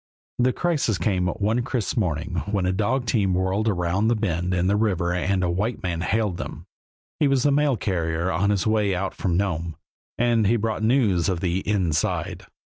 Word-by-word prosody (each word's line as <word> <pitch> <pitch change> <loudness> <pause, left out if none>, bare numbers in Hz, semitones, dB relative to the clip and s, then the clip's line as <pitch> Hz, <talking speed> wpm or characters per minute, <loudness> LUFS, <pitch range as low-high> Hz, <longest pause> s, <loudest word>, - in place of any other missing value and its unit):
The 125 +1 +3
crisis 150 - 0
came 90 -3 0
one 105 +6 0
crisp 120 -3 -2
morning 90 - -1
when 100 -3 0
a 95 - +2
dog 115 +6 0
team 100 -5 +1
whirled 95 +4 0
around 95 +2 +1
a 120 - +3
bend 90 -4 -1
in 90 -1 +1
the 100 +2 +2
river 95 -5 +1
and 95 +1 0
a 90 - +1
white 105 +7 -2
man 85 -2 -2
hailed 105 -1 0
them. - - -7 0.5
He 150 - +4
was 135 -2 +2
the 145 - +3
mail 145 -3 +2
carrier, 85 -2 -1
on 95 +4 +1
his 100 -3 +1
way 105 -3 +2
out 95 +2 -2
from 85 -3 -1
Nome, 85 -4 -2 0.4
and 115 -3 +2
he 115 - +3
brought 110 -1 -1
news 110 -7 +2
of 90 -3 -1
the 90 0 0
"inside." 85 -7 -1
100 Hz, 195 wpm, -24 LUFS, 90-110 Hz, 0.5 s, He